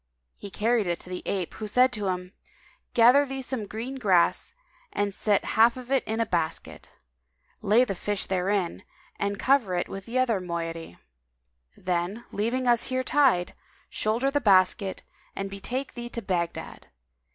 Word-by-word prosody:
He 200 - -9
carried 220 0 +1
it 170 -1 -1
to 180 - -11
the 180 - -4
ape, 185 -4 -2
who 215 - -6
said 250 +4 +4
to 210 -3 -2
him, 180 0 -3 0.6
"Gather 245 +5 +7
thee 270 -1 -5
some 245 -5 -3
green 240 +6 -5
grass 190 - +2 0.4
and 205 -1 -1
set 205 0 +1
half 230 +2 +5
of 255 0 -9
it 270 - +3
in 220 +1 -2
a 230 - +2
basket; 165 -5 -3 0.7
lay 220 +4 +4
the 200 - -2
fish 205 +2 -3
therein 190 -1 -1 0.4
and 200 0 -1
cover 235 -5 +2
it 175 - -1
with 195 +1 -8
the 240 +2 -2
other 240 -6 +2
moiety. 165 - -5 0.8
Then, 180 +5 -2
leaving 235 +5 -1
us 240 -2 +3
here 255 0 -1
tied, 255 -11 +2 0.4
shoulder 235 +6 0
the 290 +1 +1
basket 190 -2 +3 0.3
and 195 0 -4
betake 250 +7 -4
thee 240 0 -6
to 235 - -5
Baghdad. 175 -3 -3
210 Hz, 165 wpm, -26 LUFS, 185-245 Hz, 0.8 s, Gather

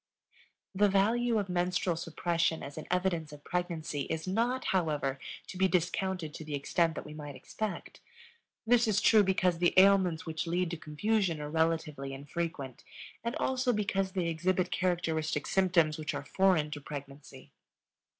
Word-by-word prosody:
The 205 +2 +4
value 225 +4 +2
of 205 -2 -1
menstrual 180 0 0
suppression 165 0 -1
as 140 +1 -7
an 155 - -7
evidence 180 -4 0
of 145 -1 -12
pregnancy 170 -5 -3
is 160 +2 -3
not, 235 +7 0
however, 150 -7 0 0.3
to 185 - -9
be 190 - +5
discounted 180 -2 -1
to 160 - -7
the 150 -1 -4
extent 160 +4 +1
that - - -6
we - - -9
might 145 -2 -8
expect. 215 -2 -5 0.7
This 235 0 +4
is 210 -2 +3
true 220 0 +6
because 185 -3 +2
the 175 0 +2
ailments 190 -4 +5
which 160 +1 -3
lead 175 +1 0
to 170 - -3
confusion 170 +3 0
are 150 0 -5
relatively 160 -4 0
infrequent, 145 -2 -5 0.4
and 235 +2 -2
also 260 -1 +1
because 195 -3 -1
they 185 -3 0
exhibit 180 +2 0
characteristic 160 -4 0
symptoms 170 -5 +2
which 155 - -3
are - - -5
foreign 180 -4 +2
to 145 -1 -5
pregnancy. 140 -1 -9
170 Hz, 160 wpm, -31 LUFS, 155-190 Hz, 0.7 s, true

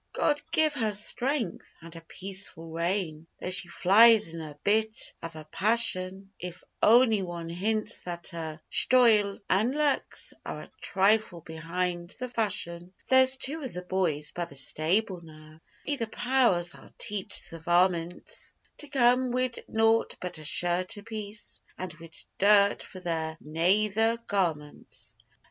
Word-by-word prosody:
'God 295 -1 +1
give 315 -2 +2
her 225 -6 0
strength! 235 - -1
and 165 0 -11
a 165 - -9
peaceful 185 -2 -3
reign 165 -1 -3
Though 180 - -4
she 185 -1 0
flies 210 +2 +5
in 165 - -6
a 150 -2 -9
bit 215 +1 +1
av 165 -1 -7
a 155 - -8
passion 195 -1 +2
If 180 0 -8 0.2
ony 225 -2 +5
wan 170 -2 -6
hints 215 +5 -1
that 175 -1 -4
her 160 -2 -6
shtoyle 220 -6 +4
an' 215 +7 +1
luks 295 -2 0
Are - - -6
a - - -14
trifle 195 -2 +1
behind 175 +2 -4
the 255 -1 -4
fashion. 185 -6 -2 0.2
'There's 260 0 +5
two 300 +5 0
of 260 -4 -6
the 180 - -5
boys 175 -5 -1
by 175 - -4
the 145 - -12
stable 170 +7 0
now 155 -1 -15 0.3
Be 290 0 -1
the 230 -3 -3
powers! 230 -8 +2
I'll - - -16
teach 205 -2 0
the 165 - -10
varmints 175 +1 -1 0.2
To 295 - -5
come 255 -2 +3
wid 250 0 -2
nought 225 +1 +2
but 180 -3 -5
a - - -9
shirt 175 +5 +2
apiece, 210 0 -7 0.2
And 185 -2 -5
wid 165 0 -14 0.2
dirt 200 0 +4
for 185 - -11
their 160 -2 -3
nayther 210 +8 +1
garmints. 160 -7 -3
190 Hz, 150 wpm, -28 LUFS, 170-225 Hz, 0.3 s, flies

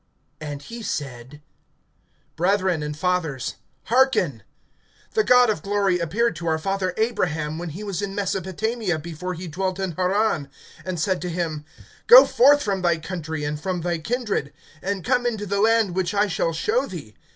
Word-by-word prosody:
(2)And 145 -2 -6
he 235 +6 -8
said: 140 - -5 0.9
Brethren, 185 -1 +1
and 150 0 -4
fathers, 150 - -1 0.3
hearken. 260 +2 +2 0.7
The 435 - +2
God 250 - +6
of 185 - -4
glory 195 -1 +1
appeared 200 +7 0
to 170 +1 -5
our 160 -1 +2
father 185 +1 -2
Abraham, 165 -9 -1
when 175 -1 -4
he 180 +8 -7
was 200 -2 -3
in 195 -1 -4
Mesopotamia, 200 0 -1
before 170 +3 -5
he 180 +2 -7
dwelt 185 +3 -2
in 190 -2 -2
Haran, 185 -3 0 0.4
(3)and 185 -1 -2
said 180 +2 0
to 180 - -3
him: 165 -3 -3 0.4
Go - - +11
forth 290 +4 +5
from 195 -2 -1
thy 170 -2 +2
country, 160 -2 -5
and 150 0 -3
from 185 0 -2
thy 175 0 -1
kindred, 215 - -2 0.3
and 195 -2 -3
come 245 -1 +2
into 220 -3 -2
the 200 0 0
land 225 -3 +3
which 190 +2 -1
I 205 +1 +4
shall 165 -3 -1
show 430 - 0
thee. - - -8
185 Hz, 170 wpm, -23 LUFS, 160-205 Hz, 0.9 s, Go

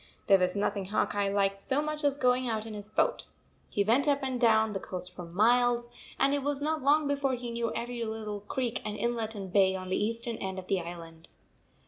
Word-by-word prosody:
There 195 -1 +6
was 180 +1 +1
nothing 200 -1 -1
Hawk 210 +3 0
Eye 200 -1 +1
liked 195 0 +1
so 265 +7 -1
much 305 0 -2
as 285 -1 +2
going 250 -1 +2
out 220 -1 -2
in 225 - -7
his 210 0 -8
boat. 215 - 0 0.4
He 205 - +1
went 240 +8 +2
up 280 -1 +2
and 260 -2 -2
down 220 -2 +4
the 195 - -2
coast 180 -1 -6
for 180 -1 -8
miles, 240 +6 +3 0.3
and 275 - +3
it 285 - 0
was 285 0 -1
not 310 +2 -1
long 290 +2 +3
before 280 -2 0
he 240 -1 -6
knew 235 -1 -1
every 235 0 -3
little 215 -2 -4
creek 240 +3 -2
and 210 0 -4
inlet 230 0 -1
and 195 -2 -7
bay 190 -2 +4
on 185 -1 -6
the 185 - +1
eastern 230 +1 -2
end 190 0 -4
of 185 - -6
the 190 -1 0
island. 165 -1 -9
220 Hz, 225 wpm, -29 LUFS, 195-250 Hz, 0.4 s, There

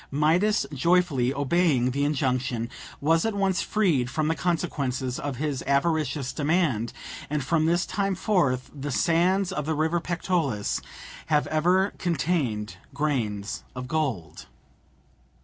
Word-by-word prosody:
Midas 170 +9 +2
joyfully 145 -4 +2
obeying 140 -2 +2
the 140 +2 0
injunction, 130 -5 -1 0.3
was 165 +3 +3
at 225 -2 -1
once 195 -2 +1
freed 165 - +1
from 155 +3 0
the - - +3
consequences 140 -7 -2
of 145 -2 -3
his 140 -1 -2
avaricious 145 -1 +1
demand, 145 -7 +1 0.4
and 150 -1 -1
from 160 +3 +1
this 175 +2 +2
time 195 -1 -1
forth 170 - +1
the 145 0 -5
sands 180 +7 +2
of 150 -5 -3
the 160 - 0
river 160 +3 +1
Pactolus 165 - -1 0.5
have 150 -2 +2
ever 180 +5 +2
contained 145 - -1 0.2
grains 115 -9 -1
of 125 0 -5
gold. 130 - -3
150 Hz, 130 wpm, -26 LUFS, 130-175 Hz, 0.5 s, was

